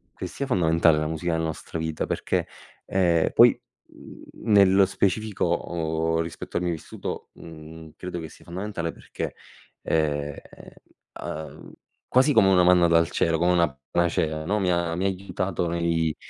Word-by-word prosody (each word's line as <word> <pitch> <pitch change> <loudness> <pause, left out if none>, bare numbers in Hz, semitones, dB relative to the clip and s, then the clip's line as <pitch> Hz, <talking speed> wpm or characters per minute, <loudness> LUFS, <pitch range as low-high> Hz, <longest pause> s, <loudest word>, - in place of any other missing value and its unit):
che - - -5
sia 140 - -5
fondamentale 80 - +3
la 75 - -1
musica 80 +2 -2
nostra 80 0 -4
vita 80 -1 -2
perché, - - -1 0.4
ehm, 85 -4 +2
poi, - - +6 0.3
mhmm, - - -14 0.2
nello 100 -3 +5
specifico 100 +2 -1
o 80 -1 -1
rispetto 85 0 -5
al 90 - -1
mio 90 - 0
vissuto, 80 - -6
mhmm, 80 0 -12
credo 90 -1 -5
che 80 -1 -7
sia - - -17
fondamentale 90 -2 -4
perché, - - -6 0.5
ehm, 75 -2 -1 0.9
uhm, 80 0 -7 0.4
quasi 130 +4 +4
come 110 -6 +5
una 90 -2 +5
manna 90 -1 +5
dal 85 0 +3
cielo, 80 0 +1
come 90 +2 +2
una 85 -2 +3 0.2
panacea, 80 -2 0
no, 105 +5 0
mi 95 -2 +1
ha 85 -1 0
mi 90 - -2
ha - - +2
aiutato 95 -2 -2
nei 85 -2 0
85 Hz, 155 wpm, -25 LUFS, 80-90 Hz, 0.9 s, poi